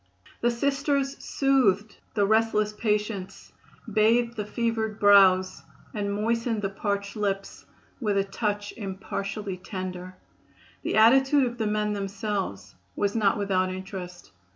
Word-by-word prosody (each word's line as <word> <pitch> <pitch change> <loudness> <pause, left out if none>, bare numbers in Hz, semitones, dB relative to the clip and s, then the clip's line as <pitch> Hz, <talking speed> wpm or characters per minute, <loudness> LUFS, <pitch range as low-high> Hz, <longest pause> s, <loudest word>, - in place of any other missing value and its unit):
The 240 - +3
Sisters 275 +2 -1
soothed 225 -7 +1 0.2
the 205 -2 +3
restless 215 0 +2
patients, 210 -3 -3 0.4
bathed 230 +2 +3
the 210 -2 -4
fevered 220 -1 -2
brows 190 -3 +5 0.3
and 205 -2 -2
moistened 225 +1 -1
the 195 - -1
parched 200 0 -3
lips 195 -2 -3 0.3
"with 210 -5 0
a 195 - +3
touch 205 +1 -3
impartially 195 0 -5
tender." 185 -1 -6 0.7
The - - -2
attitude 265 +5 +5
of 240 -1 -5
the 220 - 0
men 210 0 0
themselves 195 - -4 0.2
was 200 +1 0
not 210 -2 +2
without 190 -2 +1
interest. 185 - -8
210 Hz, 125 wpm, -26 LUFS, 195-225 Hz, 0.7 s, brows